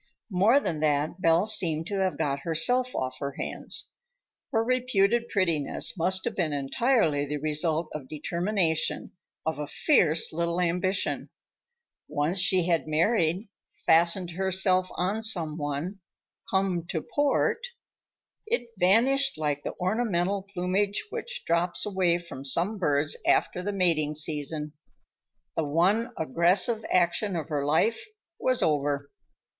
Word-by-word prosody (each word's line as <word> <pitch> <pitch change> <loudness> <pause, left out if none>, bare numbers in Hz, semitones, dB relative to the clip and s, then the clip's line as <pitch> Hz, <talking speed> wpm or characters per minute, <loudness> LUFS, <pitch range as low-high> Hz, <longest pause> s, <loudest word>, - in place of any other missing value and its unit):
More 205 +9 +4
than 165 - -3
that, 150 +3 0
Belle 165 +3 +3
seemed 170 -7 +2
to 200 +2 -3
have 190 -1 0
got 140 -1 -1
herself 245 - +1
off 130 0 -3
her 140 -1 -4
hands. - - -4 0.6
Her 225 -1 +1
reputed 240 -2 +1
prettiness 165 -8 0
must 185 +2 +1
have 235 - -3
been 165 -5 -1
entirely 145 - +1
the 150 +1 -3
result 155 +2 0
of 140 -4 -7
determination, 170 +1 -1 0.3
of 160 -2 -2
a 150 - -4
fierce 165 - +3
little 170 +1 -1
ambition. 180 +2 0 0.8
Once 155 +6 0
she 180 0 +4
had 170 -3 0
married, 170 +4 +1 0.4
fastened 170 +2 +3
herself 185 0 +2
on 195 +5 -1
some 170 -9 +1
one, 150 +6 -4 0.5
come 190 -3 0
to 160 -4 -3
port,—it 455 - -3
vanished 265 +9 +3
like 145 -2 -1
the - - -6
ornamental 195 -1 0
plumage 195 +1 -1
which - - -5
drops 170 +1 0
away 185 -4 +1
from 170 -6 -9
some 175 +10 0
birds 145 -3 +1
after 180 - +2
the 205 +3 -3
mating 165 -6 +1
season. 150 0 -2 0.8
The 165 - 0
one 180 +10 +1
aggressive 180 - +2
action 180 +2 +1
of 160 -3 -4
her 145 -2 -1
life 160 +10 +1 0.4
was 255 -1 +1
over. 145 -2 0
175 Hz, 130 wpm, -27 LUFS, 155-200 Hz, 0.8 s, More